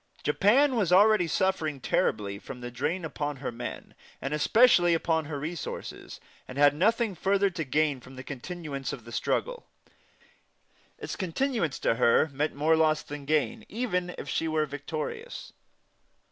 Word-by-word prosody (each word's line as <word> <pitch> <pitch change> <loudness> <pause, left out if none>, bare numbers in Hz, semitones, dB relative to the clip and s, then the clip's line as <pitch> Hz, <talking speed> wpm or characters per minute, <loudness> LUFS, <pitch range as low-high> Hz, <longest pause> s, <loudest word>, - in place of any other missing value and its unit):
Japan 260 +7 +4
was 200 -7 +1
already 200 -1 +5
suffering 160 -5 0
terribly 100 -5 0
from 125 +3 -9
the 120 0 -7
drain 160 +8 -2
upon 145 -2 -3
her 135 -1 -5
men, 120 +1 -7 0.3
and 135 - -3
especially 175 - +5
upon 160 -1 0
her 145 -1 -4
resources, 160 +3 -6 0.3
and 130 - -8
had 145 0 +6
nothing 220 +6 +2
further 195 +2 +1
to 170 -2 -3
gain 150 0 +1
from 130 +1 -14
continuance 140 0 -5
of - - -9
the - - -10
struggle; - - -2 1.3
its - - -6
continuance 190 - -1
meant - - +1
to 120 - -7
her 135 +6 +4 0.2
more 155 +3 +3
loss 155 -1 +2
than 145 -1 -8
gain, 155 +9 0
even 180 -6 -2
if - - -7
she 165 - -1
were 155 -1 +1
victorious. 155 - -6
160 Hz, 150 wpm, -28 LUFS, 145-190 Hz, 1.3 s, had